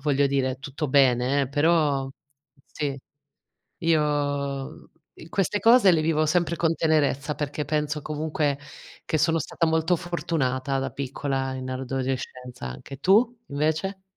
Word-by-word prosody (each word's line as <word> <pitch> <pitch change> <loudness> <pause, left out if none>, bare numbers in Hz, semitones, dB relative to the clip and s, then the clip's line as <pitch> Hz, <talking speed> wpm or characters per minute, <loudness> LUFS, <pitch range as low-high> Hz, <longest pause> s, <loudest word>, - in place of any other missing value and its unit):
voglio 140 -1 +2
dire 130 -1 0
tutto 145 +1 -4
bene, 130 0 +3
eh, 130 - -2
però 145 -2 +2 0.6
sì, 140 -2 -4 0.8
io 145 -4 -1 0.3
i 160 - -11
queste 195 +1 0
cose 230 -4 +6
le 160 -2 +2
vivo 155 -1 +2
sempre 170 0 +1
con 165 -1 +1
tenerezza 150 -2 +1
perché 150 0 -3
penso 150 -1 -1
comunque 150 -2 -1 0.5
che 155 - 0
sono 165 +2 +2
stata 165 +2 -1
molto 160 +2 +2
fortunata 140 -6 -1
da 135 - -2
piccola 135 0 -3
in 130 0 -5
adolescenza 130 - -4
anche, 95 - -8
tu 225 - +3
invece? 160 +7 -1
145 Hz, 130 wpm, -25 LUFS, 135-160 Hz, 0.8 s, cose